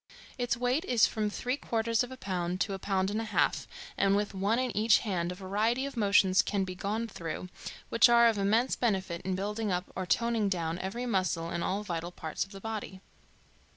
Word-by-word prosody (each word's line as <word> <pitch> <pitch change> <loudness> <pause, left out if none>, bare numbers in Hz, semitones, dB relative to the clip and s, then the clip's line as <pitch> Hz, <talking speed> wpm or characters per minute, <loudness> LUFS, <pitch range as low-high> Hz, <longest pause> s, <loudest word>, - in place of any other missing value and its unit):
Its 245 -1 0
weight 250 +6 +1
is 240 -8 +4
from 215 -1 -1
three 250 +5 -2
quarters 230 -2 0
of 245 - -7
a 260 - -8
pound 185 -3 -2
to 200 - 0
a 195 - -4
pound 190 0 0
and 215 +2 -1
a - - -4
half, 220 - +1 0.3
and 195 0 +3
with 205 0 -1
one 200 +4 +1
in 255 -1 -1
each 215 +1 +5
hand 180 -4 -1
a - - -5
variety 210 +7 0
of 280 - -6
motions 200 -3 +4
can 200 -2 -1
be 185 -1 -4
gone 210 +5 -2
through, 175 -2 -6 0.4
which 230 +1 +6
are 235 0 +7
of 220 -3 +1
immense 220 +6 +2
benefit 190 -7 -1
in 185 0 -2
building 210 +2 -2
up 180 0 -2
or 185 0 -3
toning 230 -2 +1
down 170 -2 -2
every 200 +7 -4
muscle 185 -7 0
and 170 0 -2
all 200 +2 -1
vital 170 -3 -4
parts 160 -3 -3
of 195 - -13
the 195 - -9
body. 210 -3 -5
200 Hz, 215 wpm, -30 LUFS, 185-230 Hz, 0.4 s, are